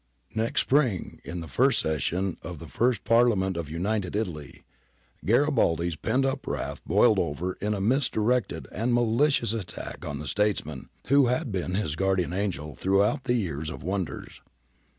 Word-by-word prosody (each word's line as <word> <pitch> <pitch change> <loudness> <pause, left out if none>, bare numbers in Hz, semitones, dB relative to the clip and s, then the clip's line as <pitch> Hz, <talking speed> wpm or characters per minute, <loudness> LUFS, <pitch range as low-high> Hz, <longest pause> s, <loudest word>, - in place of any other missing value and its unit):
Next 115 +1 +2
spring, 130 - +1
in 85 0 -5
the 80 - -7
first 130 - +3
session 85 +4 -1
of 85 0 -7
the 85 - -9
first 120 +4 +1
Parliament 115 -6 +3
of 85 -3 -4
United 95 +4 -2
Italy, 80 -9 -4 0.6
Garibaldi's 100 - +2
pent 130 - 0
up 135 - -2
wrath - - -3
boiled 105 +4 +4
over 85 +3 -2
in 105 +1 0
a 100 - -3
misdirected 125 -1 +1
and 120 +3 0
malicious 120 0 +2
attack 105 -6 -6
on 70 -1 -4
the 75 - -6
statesman 85 -7 -1 0.2
who 140 -1 +5
had 125 +1 -1
been 90 -1 -2
his 85 -7 -1
guardian 95 -1 0
angel 90 -7 -2
throughout 100 - +1
the 120 - +2
year 85 - -2
of 80 0 -6
wonders. 95 0 -4
100 Hz, 155 wpm, -27 LUFS, 85-120 Hz, 0.6 s, who